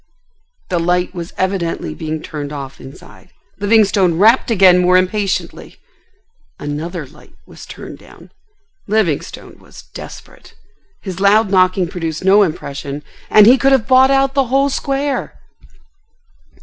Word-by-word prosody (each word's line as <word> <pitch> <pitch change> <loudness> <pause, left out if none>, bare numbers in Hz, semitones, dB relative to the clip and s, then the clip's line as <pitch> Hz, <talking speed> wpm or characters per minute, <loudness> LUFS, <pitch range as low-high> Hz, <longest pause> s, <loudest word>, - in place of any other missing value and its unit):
The 180 -2 -1
light 180 +2 0
was 175 -1 -7
evidently 185 -3 -2
being 155 -1 -6
turned 145 -2 -7
off 135 -2 -8
inside. 135 +6 -15 0.3
Livingstone 200 -4 +2
rapped 225 +8 +4
again 185 -5 +5
more 180 0 +4
impatiently. 190 +1 -3 0.8
Another 150 +3 -5
light 150 +3 -20
was - - -14
turned - - -10
down. - - -17 0.6
Livingstone 205 -8 -2
was - - -15
desperate. - - -12 0.5
His 190 -3 -7
loud 200 +1 +3
knocking 185 -1 +2
produced 165 -1 -5
no 200 +2 +5
impression, 145 -5 -4 0.3
and 210 -1 +6
he 250 +4 +6
could 270 0 +3
have 255 -4 +1
bought 260 0 +5
out 270 0 +2
the 270 -1 +1
whole 270 +3 +1
square! 275 0 -3
185 Hz, 130 wpm, -16 LUFS, 165-220 Hz, 0.8 s, and